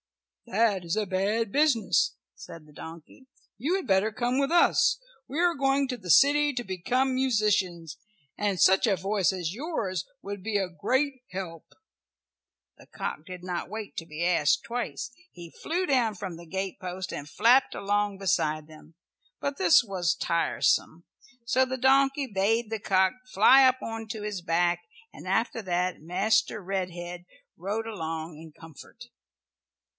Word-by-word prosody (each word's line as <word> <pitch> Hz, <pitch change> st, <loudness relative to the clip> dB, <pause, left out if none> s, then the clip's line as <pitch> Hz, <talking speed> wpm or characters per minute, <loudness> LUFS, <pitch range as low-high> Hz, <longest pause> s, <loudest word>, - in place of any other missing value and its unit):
"That 215 Hz, -4 st, +1 dB
is 170 Hz, +4 st, -2 dB
a 215 Hz, -, +1 dB
bad 200 Hz, +3 st, -1 dB
business," 285 Hz, -5 st, +2 dB, 0.2 s
said 165 Hz, -2 st, -11 dB
the 150 Hz, -, -19 dB
donkey. 165 Hz, -, -12 dB, 0.3 s
"You 295 Hz, -, 0 dB
had 385 Hz, -, -3 dB
better 195 Hz, +2 st, +2 dB
come 245 Hz, +4 st, -1 dB
with 275 Hz, +1 st, 0 dB
us. 345 Hz, +7 st, +4 dB, 0.3 s
We 290 Hz, +5 st, -4 dB
are 350 Hz, 0 st, +3 dB
going 275 Hz, -1 st, +1 dB
to 255 Hz, -, -2 dB
the 195 Hz, -7 st, -11 dB
city 290 Hz, -, +5 dB
to 245 Hz, -2 st, -3 dB
become 245 Hz, +8 st, 0 dB
musicians, 200 Hz, -, 0 dB, 0.4 s
and 200 Hz, -3 st, -1 dB
such 190 Hz, +5 st, +5 dB
a 195 Hz, -3 st, +2 dB
voice 195 Hz, -2 st, +1 dB
as 180 Hz, -3 st, -3 dB
yours 215 Hz, -, -3 dB, 0.2 s
would 200 Hz, -1 st, -6 dB
be 215 Hz, -1 st, 0 dB
a 195 Hz, -2 st, 0 dB
great 260 Hz, -, -1 dB
help." 180 Hz, -3 st, -8 dB, 1.0 s
The -, -, -18 dB
cock 155 Hz, -, -5 dB
did 180 Hz, -1 st, -8 dB
not 180 Hz, -1 st, -4 dB
wait 215 Hz, 0 st, -7 dB
to 165 Hz, -, -4 dB
be 155 Hz, +2 st, -3 dB
asked 170 Hz, -5 st, +2 dB
twice. 240 Hz, +1 st, -4 dB, 0.2 s
He 170 Hz, -2 st, -11 dB
flew 355 Hz, +4 st, -2 dB
down 245 Hz, -8 st, +1 dB
from 185 Hz, -3 st, -6 dB
the 170 Hz, 0 st, -12 dB
gatepost 190 Hz, 0 st, -5 dB
and 145 Hz, +1 st, -6 dB
flapped 250 Hz, -, +4 dB
along 205 Hz, 0 st, -1 dB
beside 155 Hz, -6 st, 0 dB
them, 155 Hz, 0 st, -16 dB, 0.4 s
but 280 Hz, 0 st, -3 dB
this 355 Hz, -8 st, +5 dB
was 185 Hz, -5 st, -1 dB
tiresome, 160 Hz, +1 st, 0 dB, 0.4 s
so 255 Hz, +2 st, +3 dB
the 260 Hz, 0 st, -3 dB
donkey 270 Hz, +2 st, +3 dB
bade 220 Hz, +1 st, 0 dB
the 220 Hz, -, -2 dB
cock 190 Hz, -1 st, +2 dB, 0.2 s
fly 260 Hz, +7 st, +7 dB
up 260 Hz, 0 st, +3 dB
on 225 Hz, 0 st, -5 dB
to 215 Hz, -1 st, -6 dB
his 210 Hz, -3 st, -4 dB
back, 175 Hz, 0 st, +1 dB, 0.3 s
and -, -, -11 dB
after 225 Hz, +4 st, 0 dB
that 180 Hz, -3 st, -1 dB
Master 195 Hz, +7 st, +1 dB
Red 190 Hz, -1 st, -2 dB
head 175 Hz, 0 st, -8 dB, 0.3 s
rode 205 Hz, +6 st, -3 dB
along 160 Hz, -5 st, -5 dB
in 160 Hz, +1 st, -12 dB
comfort. 165 Hz, -, -14 dB
200 Hz, 160 wpm, -27 LUFS, 175-245 Hz, 1.0 s, fly